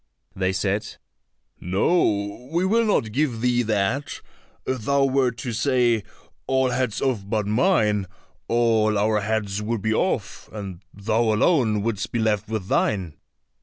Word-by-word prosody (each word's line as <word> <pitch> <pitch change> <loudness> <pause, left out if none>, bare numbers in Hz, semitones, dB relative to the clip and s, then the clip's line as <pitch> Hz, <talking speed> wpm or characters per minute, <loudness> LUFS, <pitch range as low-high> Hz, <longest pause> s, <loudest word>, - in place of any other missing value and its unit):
They 95 0 0
said, 100 +2 -2 0.6
"No, 100 - 0
we 170 +3 +1
will 230 +4 +3
not 120 - +1
give 130 -1 0
thee 120 0 +2
that; 110 +5 -1 0.5
if 130 -2 -2
thou 140 +4 +2
were 135 -1 +2
to 120 0 -5
say, 120 -2 +2 0.4
All 130 -1 +2
heads 125 -2 -1
off 130 -6 0
but 110 -2 0
mine,' 105 - +2 0.4
all 110 -2 +2
our 105 +1 +2
heads 105 -1 -2
would 110 -1 -3
be 110 - +1
off, 110 - -2
and 100 -5 -7
thou 110 +3 -1
alone 110 - +2
wouldst 110 0 -2
be - - -1
left 110 -2 0
with 110 -4 -3
thine." 95 -7 0
110 Hz, 145 wpm, -23 LUFS, 105-130 Hz, 0.6 s, will